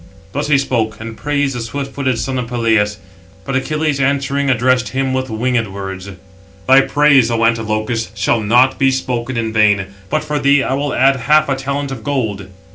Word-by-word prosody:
Thus - - -3
he 150 -2 +4
spoke; 110 -5 -1
and 110 0 -7
praised 145 0 -1
the - - -3
swift 135 +4 -5
footed 130 -4 -1
son 130 +1 -2
of 125 - -4
Peleus. 110 -4 +1 0.5
But 135 - -3
Achilles, 150 +1 -1
answering, 140 +1 0
addressed 125 0 +2
him 135 0 -1
with 130 0 -2
words: 100 -5 -3 0.6
"Thy 135 +1 +7
praise, 140 -4 +3
O 115 -1 +1
Antilochus, 110 0 -1
shall 105 +3 +1
not 125 +5 +3
be 135 - +4
spoken 130 -2 -2
in 110 -1 -2
vain, 100 -3 +2 0.2
but 155 0 -1
for 150 -1 -2
thee 140 0 +3
I - - -1
will 140 +1 -2
add 135 +1 +3
half 150 +6 +3
a 135 - +1
talent 140 +1 -3
of 120 -5 -7
gold." 110 -8 -2
130 Hz, 185 wpm, -16 LUFS, 115-140 Hz, 0.6 s, Thy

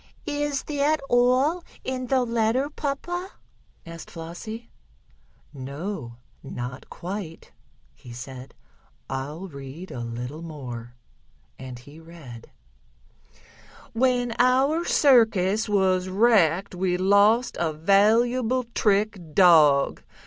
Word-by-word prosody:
"Is 290 -1 -2
that 300 +1 0
all 255 +8 +3 0.2
in 255 -1 -4
the 260 0 +2
letter, 235 +4 0
papa?" 350 +7 -4 0.5
asked 165 -1 -10
Flossie. 180 +8 -8 0.8
"No, 140 - -6 0.2
not 125 -1 -7
quite," 180 -2 -7 0.4
he 120 - -14
said. 125 +2 -9 0.6
"I'll 145 +8 -5
read 140 +3 -10
a 125 - -6
little 120 +6 -6
more," 125 -7 -8 0.6
and 130 -1 -8
he 145 +6 -14
read: 160 -9 -12 1.4
"When 245 0 +1
our 270 +7 +3
circus 220 -6 +3
was 185 -2 +1
wrecked 195 -3 +3
we 180 0 0
lost 205 +6 +3
a 165 -2 0
valuable 225 +9 +2
trick 200 -6 0
dog. 155 -7 +5
190 Hz, 100 wpm, -25 LUFS, 150-245 Hz, 1.4 s, dog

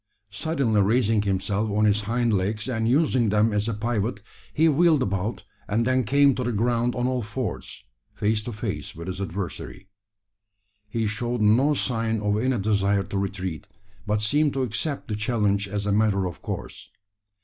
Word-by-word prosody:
Suddenly 120 -3 +1
raising 110 +1 +2
himself 100 +2 -1
on 105 +1 +2
his 105 0 +3
hind 115 +2 0
legs, 105 +3 -1
and 115 -3 0
using 130 -4 +3
them 105 +1 +2
as 105 +1 0
a 115 - -1
pivot, 115 +1 -2 0.3
he 160 +2 +3
wheeled 155 -2 +4
about, 100 +3 -2 0.2
and 115 +3 +1
then 130 -1 +2
came 140 +4 +4
to 125 - -3
the 120 - -1
ground 120 +2 +1
on 125 0 -1
all 130 -1 0
fours, 110 +2 -5 0.3
face 105 +1 +1
to 120 - -4
face 105 -2 -5
with 85 +1 -7
his 95 +1 -5
adversary. 95 +1 -6 1.0
He 115 +1 -1
showed 120 +3 -2
no 125 +8 +4
sign 115 -4 -1
of 105 0 0
any 130 +1 +1
desire 100 -1 +1
to 100 - -4
retreat, 95 -4 -4 0.4
but 105 0 0
seemed 145 +6 +2
to 135 - 0
accept 130 +5 -3
the 105 - -2
challenge 105 -2 0
as 100 +1 -3
a 105 - 0
matter 100 -2 +2
of 90 -2 -6
course. - - -6
110 Hz, 175 wpm, -25 LUFS, 100-125 Hz, 1.0 s, wheeled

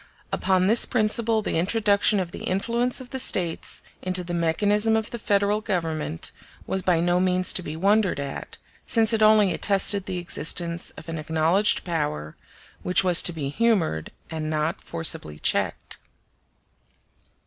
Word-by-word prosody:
Upon 185 -1 +1
this 225 +4 +5
principle 220 -1 +1
the 165 - -1
introduction 205 +2 +2
of 180 -2 -4
the - - -8
influence 235 +6 -1
of 245 - -13
the 265 - -3
States 175 -9 0 0.2
into 185 0 -1
the 175 0 -6
mechanism 205 +6 +1
of 220 0 -4
the 235 - -6
Federal 205 0 0
Government 165 - -3 0.3
was 190 - -2
by 175 -2 +1
no 175 +1 +1
means 185 0 +2
to - - 0
be 155 -3 -7
wondered 200 0 +1
at, 140 -1 -7 0.3
since 225 -1 +2
it 220 - 0
only 215 -2 +5
attested 200 -1 +1
the 185 - -3
existence 170 0 0
of - - -12
an 165 -1 -5
acknowledged 160 +6 +1
power, 150 - -3 0.5
which 180 +1 +2
was 180 -2 +4
to - - +3
be 150 -5 -4
humored 175 - 0 0.2
and 155 -1 -4
not 155 +1 -2
forcibly 160 - 0
checked. - - -1
185 Hz, 155 wpm, -24 LUFS, 165-210 Hz, 0.5 s, this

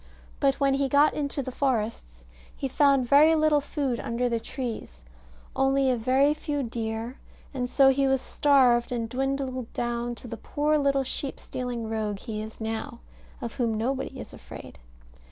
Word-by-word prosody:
But 275 -1 +3
when 275 -1 +3
he 275 0 +1
got 285 +3 +4
into 280 -1 -2
the 260 - -5
forests, 220 - -2 0.3
he 275 - -3
found 275 -1 +3
very 300 +5 +6
little 310 -2 +3
food 275 -4 -2
under 235 +2 -1
the 235 -1 0
trees, 225 - -6 0.5
only 270 0 +3
a - - +2
very 260 +5 +3
few 295 -2 -3
deer; 225 +1 -4 0.3
and 250 -2 -2
so 270 0 +5
he 270 +1 +2
was 265 0 +2
starved, 255 -4 +3
and 235 -2 -2
dwindled 260 0 -2
down 240 0 -2
to 245 - -9
the 230 0 -6
poor 300 +4 0
little 275 -1 +2
sheep 265 +1 -3
stealing 245 -3 -4
rogue 215 -2 -2
he 215 0 -5
is 220 +1 -9
now, 225 +1 -4 0.4
of 235 - -5
whom 230 -3 0
nobody 260 +5 -2
is - - -9
afraid. - - -11
255 Hz, 170 wpm, -27 LUFS, 230-275 Hz, 0.5 s, very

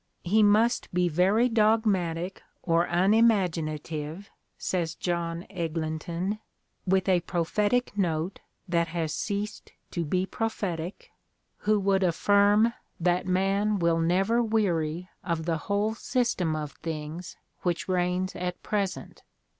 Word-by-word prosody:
"He 210 +5 +3
must 215 +3 +3
be 180 0 +2
very 190 +9 +3
dogmatic 205 -6 +1 0.2
or 170 -1 +3
unimaginative," 175 -4 +1 0.3
says 170 -3 -2
John 170 -1 -2
Eglinton, 170 +3 -3 0.5
with 190 +1 +2
a 185 -2 +4
prophetic 205 +8 0
note 175 -2 -1 0.3
that 170 -1 +1
has 165 -2 -2
ceased 210 -1 -4 0.2
to 170 - -1
be 180 +4 0
prophetic, 190 -5 -4 0.6
"who 215 -1 +5
would 195 0 +2
affirm 205 +5 +4 0.3
that 175 +1 +1
man 195 +3 +2
wiU 170 -2 +2
never 195 +8 +2
weary 180 -7 0 0.2
of 165 -3 -2
the 165 -1 0
whole 205 +2 +1
system 225 -9 0
of 150 -2 -4
things 160 +2 -5 0.2
which 175 -1 -1
reigns 180 0 0
at 180 0 -4
present. 200 -3 -3
180 Hz, 115 wpm, -27 LUFS, 170-205 Hz, 0.6 s, who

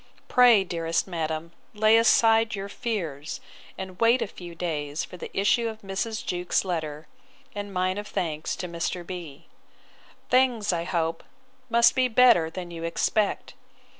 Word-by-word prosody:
Pray, 245 -5 +6
dearest 165 -2 -1
madam, 165 -2 -4 0.2
lay 215 +1 +5
aside 225 -1 +4
your 195 0 -5
fears, 170 - -4 0.4
and 190 -1 -7
wait 230 +2 +4
a - - -2
few 175 -3 -10
days 155 -3 -3
for - - -12
the 180 - -8
issue 230 +4 +2
of 220 0 -9
Mrs. 200 +3 -3
Jewkes's 180 +2 -1
letter, 155 -4 -4 0.5
and 205 -1 -5
mine 185 +1 -1
of 210 - -7
thanks 155 -6 -3
to 180 - -5
Mr. 170 +1 -3
B——. 170 -6 -8 0.8
Things, 245 -6 +2
I 170 0 -2
hope, 165 -2 -1 0.5
must 235 0 +5
be 260 -1 +2
better 235 -9 +5
than 175 +1 -7
you 165 -1 -7
expect. 200 +5 0
185 Hz, 150 wpm, -26 LUFS, 165-220 Hz, 0.8 s, Pray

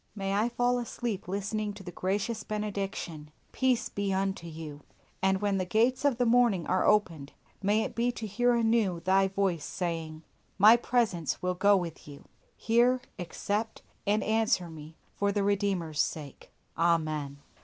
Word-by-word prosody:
May 195 -1 -2
I 215 +4 +2
fall 245 +1 +1
asleep 235 -4 -4
listening 205 +2 -2
to 200 - -10
the 175 - -7
gracious 205 +5 -2
benediction, 195 -7 -4 0.2
"Peace 260 -2 +1
be 200 -1 -2
unto 190 -2 -1
you." 155 -2 -8 0.4
And 190 0 +2
when 200 -2 +1
the - - +1
gates 230 +8 +2
of 275 -5 +3
the 245 - +2
morning 230 -7 +3
are 185 - +1
opened, 165 -9 +1 0.3
may 205 +2 +2
it - - -5
be 240 +1 +1
to 225 - -6
hear 240 +4 +2
anew 225 -6 +1
Thy 190 +2 +3
voice 190 -5 -1
saying, 160 -1 -4 0.3
"My 210 +4 +8
presence 230 - 0
will 180 0 +1
go 200 +2 +4
with 170 -5 -5
you." 145 -1 -12 0.3
Hear, 240 +3 +3 0.2
accept, 205 +5 -3 0.2
and 210 +1 +2
answer 220 -6 +1
me, 155 0 -11 0.2
for 200 0 0
the 200 0 0
Redeemer's 195 -6 0
sake. 145 -4 -5 0.2
Amen. 155 -4 0
195 Hz, 160 wpm, -29 LUFS, 170-220 Hz, 0.4 s, My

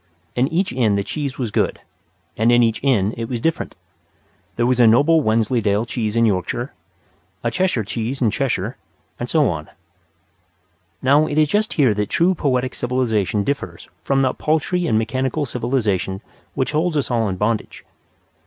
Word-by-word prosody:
In 125 +2 +2
each 180 +5 -1
inn 115 -5 +2
the 100 - 0
cheese 140 +2 -4
was 120 -5 -3
good; - - 0 0.6
and 115 +2 +3
in 120 0 +5
each 115 +1 0
inn 110 -7 +2
it 115 -1 -4
was 120 -3 -2
different. 165 +7 -2 0.8
There 120 - +1
was 125 0 +1
a 120 - +7
noble 145 +8 +5
Wensleydale 110 -2 +1
cheese 110 -2 -3
in 115 0 +4
Yorkshire, 95 -5 -1 0.7
a 115 - 0
Cheshire 185 -11 0
cheese 115 +6 -4
in 115 -4 +2
Cheshire, 120 -2 -2 0.4
and 120 - -4
so 155 -3 +3
on. 80 -2 -3 1.3
Now, 145 +4 +4
it 145 - -3
is 155 -1 +4
just 210 +4 +1
here 130 -8 +3
that 105 0 -2
true 175 +3 +3
poetic 130 -6 0
civilization 115 -5 0
differs 140 +6 -4
from 135 0 +2
that 130 - -1
paltry 165 +3 0
and 110 - +2
mechanical 130 +6 -1
civilization 110 -7 -1 0.3
which 130 0 0
holds 155 +1 0
us 140 - -1
all 115 -3 +1
in 95 - -2
bondage. 105 +3 -2
125 Hz, 170 wpm, -20 LUFS, 110-140 Hz, 1.3 s, a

